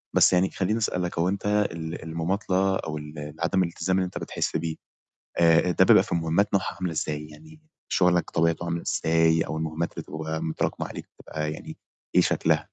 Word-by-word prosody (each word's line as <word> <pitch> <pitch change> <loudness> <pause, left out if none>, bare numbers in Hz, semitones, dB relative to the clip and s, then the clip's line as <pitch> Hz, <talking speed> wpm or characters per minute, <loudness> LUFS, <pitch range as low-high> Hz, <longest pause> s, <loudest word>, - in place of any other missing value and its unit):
بس - - +6
يعني 90 +1 +3
خلّيني 105 +4 -1
أسألك، 90 -5 -1
هو 90 +2 +2
أنت 100 +1 -3 0.3
ال 80 0 -6
المماطلة 95 +4 0
أو 80 -4 -3
ال 75 +1 -8
ال 75 +1 -7
عدم 95 +2 +2
الالتزام 95 +2 -1
اللي 95 - +1
أنت 90 - -6
بتحس - - -2
بيه، 80 0 -3 0.6
آآ، 85 +1 +5
ده - - +4
بيبقى - - +7
في - - -3
مهمات 85 +5 +1
نوعها 95 -1 0
عاملة 90 -2 -3
إزاي؟ 75 -1 -3
يعني 155 - -15 0.3
شغلك 90 -2 +3
طبيعته 85 +1 +1
عاملة 85 0 -2
إزاي 80 0 +2
أو 80 - -2
المهمات 80 +1 -2
اللي - - -6
بتبقى 80 +1 -4
متراكمة 80 -1 -2
عليك - - -8
بتبقى 75 0 -4
يعني - - -8 0.4
إيه - - +7
شكلها؟ - - +2
85 Hz, 190 wpm, -26 LUFS, 80-95 Hz, 0.6 s, بيبقى